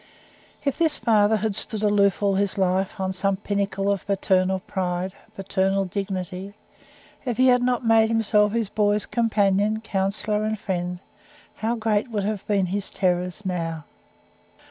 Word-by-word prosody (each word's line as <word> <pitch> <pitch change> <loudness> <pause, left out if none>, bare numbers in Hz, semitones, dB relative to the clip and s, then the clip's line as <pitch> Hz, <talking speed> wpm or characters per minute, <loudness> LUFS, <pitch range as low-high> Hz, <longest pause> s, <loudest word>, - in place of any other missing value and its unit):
If 280 +1 -1
this 320 -3 +3
father 215 -1 +3
had 215 0 -1
stood 215 +1 0
aloof 205 -1 +2
all 200 -1 +3
his 200 0 0
life, 190 +1 0
on 190 0 -1
some 195 +1 0
pinnacle 200 -1 -1
of 200 -1 -3
paternal 190 -1 +1
"pride," 185 -1 -3 0.2
paternal 195 0 0
"dignity" 190 +1 -5 0.7
if 245 -4 -3
he 255 0 +5
had 250 0 +4
not 245 -1 0
made 225 -1 +4
himself 210 -2 +2
his 230 -2 0
boys' 205 0 +1
companion, 215 -2 +1
counsellor, 210 +1 -1
and 215 0 -1
friend, 180 -2 -3 0.6
how 225 +2 -1
great 220 0 0
would 210 -3 -2
have 210 -1 -3
been 200 -3 +2
his 195 +2 -2
terrors 180 +1 -1
now! 165 -4 -3
200 Hz, 150 wpm, -24 LUFS, 190-215 Hz, 0.7 s, he